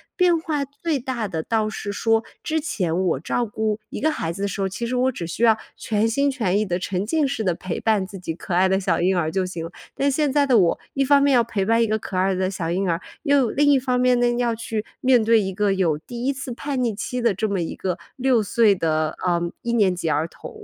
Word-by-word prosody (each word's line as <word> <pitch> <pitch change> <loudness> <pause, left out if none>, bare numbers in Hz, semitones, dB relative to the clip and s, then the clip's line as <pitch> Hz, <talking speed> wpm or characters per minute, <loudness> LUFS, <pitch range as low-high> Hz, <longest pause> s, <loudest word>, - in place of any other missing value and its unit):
变 350 -3 +3
化 305 -3 -2
最 285 +2 -3
大 245 -4 -3
的 165 -5 -3
倒 220 +4 0
是 210 -1 -5
说 225 +2 +1 0.2
之 315 0 0
前 185 - -1
我 165 -7 +1
照 240 - -1
顾 215 0 -2
1 - - -5
个 315 +3 +2
孩 165 - -3
子 195 +4 -5
的 - - +1
时 200 0 -4
候， 195 - 0
其 215 +5 -4
实 245 +2 -2
我 255 +1 +2
只 180 -8 -6
需 170 +8 -3
要 225 -2 +5 0.2
全 215 0 0
心 280 +5 +1
全 220 -8 0
意 215 - 0
地、 175 -2 -1
沉 185 +1 -2
浸 295 +6 +1
式 225 -5 -2
地 180 -3 +1
陪 180 -1 -5
伴 215 -4 +1
自 195 0 -9
己 165 -2 -4
可 175 - -6
爱 185 +2 +4
的 190 0 +2
小 185 -4 0
婴 185 +1 +2
儿 160 -2 0
就 190 +1 0
行 175 -3 -5
了。 165 - -8 0.2
但 280 +1 +1
现 290 0 +1
在 285 0 +3
的 255 -4 +4
我 170 -3 +2
一 275 - +1
方 280 +1 +5
面 280 -1 +4
要 240 -2 +5
陪 205 -4 -2
伴 230 +2 +3
一 - - +1
个 215 - +1
可 200 -3 -7
爱 190 +1 +2
的 185 0 0
小 180 -4 -3
婴 185 +3 0
儿， 165 +1 0 0.2
又 280 -6 +3
另 290 +3 +3
一 275 - +5
方 250 -1 0
面 250 0 +4
呢， 240 0 +2
要 240 -1 +1
去 225 -1 -4 0.2
面 255 -2 +4
对 225 0 +4
一 190 -1 -2
个 200 +1 +1
有 175 -6 +1
第 240 +9 -7
1 275 - +2
次 270 -2 -6
叛 270 +1 -3
逆 230 -3 0
期 250 +4 -4
的 235 -4 +2
这 210 +3 -2
么 195 -2 -1
一 165 - -3
个 185 -2 -3 0.2
6 255 -4 +2
岁 210 0 +3
的， 155 -2 -1
呃， 175 -1 +2 0.2
一 235 - -1
年 200 -6 +3
级 170 -2 -2
儿 155 +3 0
童。 455 - -11
220 Hz, 280 characters per minute, -23 LUFS, 185-255 Hz, 0.2 s, 要